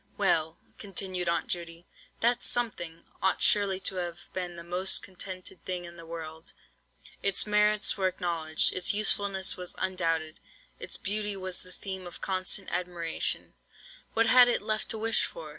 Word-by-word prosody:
"Well," 165 -5 +1 0.2
continued 185 -3 -2
Aunt 170 - 0
Judy, 170 -1 -5 0.4
"that 240 +1 +2
'something' 175 -9 -1 0.2
ought 190 - +2
surely 200 -2 +4
to 190 0 0
have 175 -2 -5
been 180 -2 -4
the 170 - -8
most 180 +3 +4
contented 185 0 -6
thing 180 -1 -3
in 170 0 -10
the 165 -1 -12
world. 160 -1 -7 0.7
Its 200 -1 +2
merits 210 0 +3
were 190 -1 +2
acknowledged; 170 -4 +1
its 185 +2 +1
usefulness 200 -2 +2
was 180 -1 -5
undoubted; 165 -4 -1 0.4
its - - -3
beauty 205 0 +1
was 185 -1 -4
the 185 - -15
theme 190 -1 -7
of 175 - -10
constant 190 +1 0
admiration; 175 -2 0 0.6
what 230 0 +4
had 250 +2 +7
it 240 - +1
left 215 0 -2
to 225 - -1
wish 225 0 +2
for? 160 -2 -8
185 Hz, 160 wpm, -29 LUFS, 170-200 Hz, 0.7 s, had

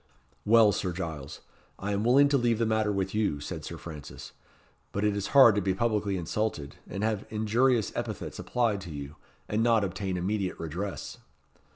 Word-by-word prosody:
"Well, 110 -1 +6
Sir 90 -2 -2
Giles, 80 -6 -6 0.4
I 100 +2 -3
am 100 +1 0
willing 135 +5 +6
to 140 - +3
leave 120 -2 +2
the 115 - +1
matter 110 -1 +1
with 95 -1 -2
you," 105 -9 0
said 75 - -6
Sir - - -6
Francis; 75 -4 -9 0.6
"but 100 - -2
it 105 -1 +2
is 100 -1 -2
hard 125 -5 +9
to 105 - 0
be 95 -1 0
publicly 105 -2 0
insulted, 85 -5 -3
and 100 +3 -4
have 110 -2 0
injurious 110 +1 +2
epithets - - -4
applied 115 -5 0
to 90 - -9
you, 70 0 -7 0.3
and 105 +1 0
not 115 -2 +3
obtain 95 0 -3
immediate 95 +1 -2
redress." 85 0 -5
100 Hz, 180 wpm, -28 LUFS, 90-110 Hz, 0.6 s, hard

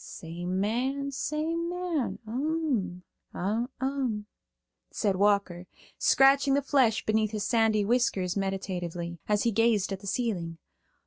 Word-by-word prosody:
"Same 175 +3 -5
man, 260 +7 -1
same 320 +4 -2
man. 350 -6 -2
Um, 245 - -1 0.3
um," 240 +2 -2 0.7
saidWalker, 200 -3 +1 0.3
scratching 275 0 +5
the 285 - +1
flesh 255 -6 +2
beneath 215 0 +2
his 210 -1 -3
sandy 220 -3 +2
whiskers 200 -6 +1
meditatively, 180 -3 -3
as 210 -1 +2
he 235 - +2
gazed 220 -2 +2
at 190 - -5
the 200 - -10
ceiling. 185 -8 -2
220 Hz, 115 wpm, -28 LUFS, 190-270 Hz, 0.7 s, scratching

